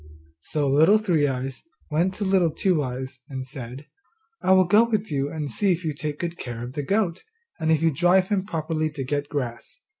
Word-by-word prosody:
So 145 - -2
Little 160 +10 +5
Three 175 -9 +2
eyes 130 0 -3 0.3
went 175 +5 +1
to 210 - -3
Little 190 -3 +3
Two 175 0 +1
eyes 130 0 -5
and 130 -2 -5
said, 130 +1 -8 0.6
'I 190 - +4
will 185 0 +6
go 205 +6 +6
with 215 -4 -1
you 140 -1 0
and 150 -2 -4
see 200 -2 +2
if 170 0 -5
you 155 - -1
take 150 0 -4
good 170 +1 -4
care 120 -2 -5
of 125 +1 -7
the 145 - -2
goat, 185 +2 0 0.4
and 160 0 +1
if 160 0 +2
you 165 - +4
drive 180 +5 +3
him 200 -3 +1
properly 155 -3 -1
to 145 -3 -5
get 145 +2 -2
grass. 125 -5 -5
155 Hz, 210 wpm, -24 LUFS, 135-180 Hz, 0.6 s, will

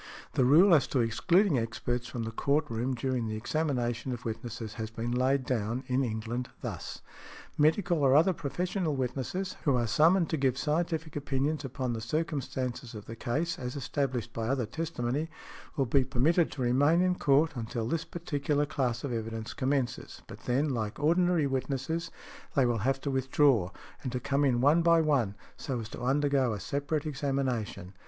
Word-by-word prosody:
The 130 - +3
rule 170 +8 +7
as 150 - +5
to 135 - 0
excluding 140 - +3
experts 120 +2 -2
from 120 -1 -4
the 115 - -4
court 145 +6 +1
room 120 +3 -1
during 125 -1 -1
the 110 - -3
examination 125 -1 -1
of 120 0 -6
witnesses 115 -1 -5
has 110 -1 -5
been 115 +1 -4
laid 130 +2 +2
down, 120 +1 -1
in 130 +1 +1
England, 115 +2 -3
thus: - - -6 0.5
"Medical 165 +3 +3
or 135 -2 +4
other 165 +5 +5
professional 175 +1 -2
witnesses, 135 +9 -3
who 140 -4 +3
are 120 - +1
summoned 165 - +4
to 160 - +1
give 130 -2 +1
scientific 160 +1 -1
opinions 145 +1 -1
upon 130 -2 -3
the 115 - -4
circumstances 130 -3 -3
of 105 -1 -8
the 115 - -7
case, 150 +10 -2
as 125 0 -4
established 130 -3 -2
by 115 -1 -3
other 130 -1 0
testimony, 155 0 -2 0.5
will 135 - +2
be 130 +3 +3
permitted 145 +7 +2
to 130 - -3
remain 145 +8 +4
in 185 0 +3
court 150 -1 +3
until 115 -1 -3
this 165 +5 -1
particular 145 -3 -1
class 125 -4 -1
of 135 -4 -2
evidence 115 -1 -4
commences; 130 -3 -2
but - - -12
then, 135 +5 +1
like 110 -5 -2
ordinary 170 +1 +3
witnesses, 135 +5 -2 0.5
they 135 -3 +4
will 120 -2 +1
have 135 +5 +1
to 140 - -2
withdraw, 130 -6 +3 0.3
and 130 - -4
to 125 - -2
come 140 +3 0
in 125 -4 +2
one 150 +5 +5
by 170 0 +5
one, 135 -10 +1 0.2
so 130 -4 -3
as 110 - -5
to - - -8
undergo 135 -1 +2
a 105 - -4
separate 145 - -2
examination." 135 - -2
135 Hz, 175 wpm, -30 LUFS, 120-150 Hz, 0.5 s, rule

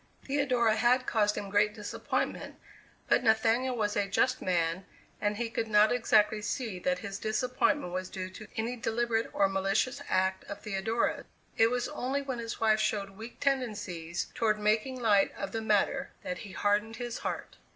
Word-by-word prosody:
Theodora 255 -6 +2
had 250 +1 +3
caused 210 -3 +1
him 200 -1 -5
great 210 +1 +3
disappointment, 210 -2 -3 0.5
but - - +3
Nathaniel 230 +3 +3
was 210 -2 0
a 205 -1 +1
just 255 +6 +1
man 170 0 0 0.4
and 205 0 0
he 235 +1 -1
could 225 0 -2
not 210 0 +5
exactly 215 -3 +3
see 210 -2 -3
that 180 0 0
his 195 0 -5
disappointment 220 -1 0
was 185 0 -3
due 185 0 -5
to 215 +2 -10
any 230 +3 -1
deliberate 230 -1 0
or 200 - +3
malicious 195 +8 0
act 190 0 +1
of 205 0 -7
Theodora's; 215 +3 -1 0.3
it 225 0 +5
was 245 0 -1
only 275 +3 -2
when 260 -3 -4
his 230 -1 -5
wife 220 -1 +3
showed 205 -2 0
weak 220 +4 -10
tendencies 205 - -2
toward 215 -2 +1
making 215 +5 +1
light 205 -4 +3
of 195 - -4
the 225 - -2
matter 220 +6 +1
that 180 - -4
he 200 -3 -9
hardened 210 +3 +1
his 240 -1 -5
heart. - - -5
215 Hz, 170 wpm, -30 LUFS, 200-240 Hz, 0.5 s, not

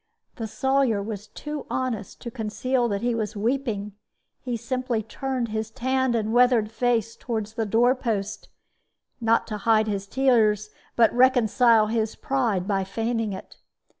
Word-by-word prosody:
The 225 - -3
Sawyer 265 -2 +1
was 210 0 -6
too 300 -1 -7
honest 230 -7 -3
to 235 - -6
conceal 240 +2 -1
that 200 -1 -2
he 240 0 +1
was 220 -2 -3
weeping. 220 -2 -1 0.5
He 245 -2 -3
simply 250 -1 -2
turned 255 +1 -3
his 220 0 -3
tanned 260 +1 0
and 220 -1 -1
weathered 240 -3 +4
face 230 -1 0
toward 225 -3 -3
the 220 +1 -4
door 235 +4 +4
post, 220 -6 -3 0.7
not 230 0 +3
to 215 - -4
hide 220 +1 +3
his 200 -2 -3
tears, 215 -5 +2 0.2
but 230 -2 +4
reconcile 240 -2 +4
his 220 0 -1
pride 230 -9 -1
by 195 -2 +1
feigning 225 +2 -2
it. 190 - -9
225 Hz, 150 wpm, -25 LUFS, 215-250 Hz, 0.7 s, weathered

